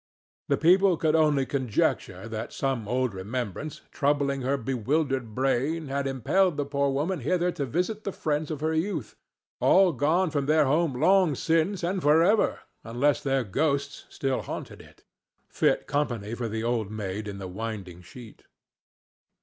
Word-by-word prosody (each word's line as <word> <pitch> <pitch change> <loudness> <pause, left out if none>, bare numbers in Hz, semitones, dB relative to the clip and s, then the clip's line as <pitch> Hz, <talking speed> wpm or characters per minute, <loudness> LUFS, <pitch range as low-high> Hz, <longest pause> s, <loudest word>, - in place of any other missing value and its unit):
The - - +2
people 185 +2 +4
could 155 0 +1
only 150 -4 +3
conjecture 130 -4 -1
that 110 -1 -5
some 130 -6 -2
old 125 -1 0
remembrance, 115 - -5
troubling 140 -1 0
her 135 +2 0
bewildered 130 -1 -1
brain, 135 +4 0
had 140 0 -1
impelled 150 - +1
the 145 - -1
poor 140 0 0
woman 150 +6 -1
hither 175 +6 0
to 140 -5 -4
visit 180 - -2
the 200 - -3
friends 150 -3 -2
of 150 -3 -4
her 160 +1 0
youth—all 190 +1 0
gone 160 +7 +1
from 140 -2 -1
their 155 0 +4
home 145 -2 +1
long 185 -4 +4
since 165 +6 0
and 185 +2 -1
for 155 +2 +5
ever 210 +4 +2 0.2
unless 125 +6 +1
their 135 -2 0
ghosts 140 +6 -1
still 135 -2 -2
haunted - - -7
it, - - -19 0.4
fit - - +1
company 120 -7 -2
for 120 -1 -3
the 110 +1 -3
Old 115 -3 -1
Maid 105 -1 -4
in 100 -1 -6
the 95 -1 -6
Winding 95 -3 -6
Sheet. 110 +5 -13
140 Hz, 160 wpm, -27 LUFS, 120-160 Hz, 0.4 s, for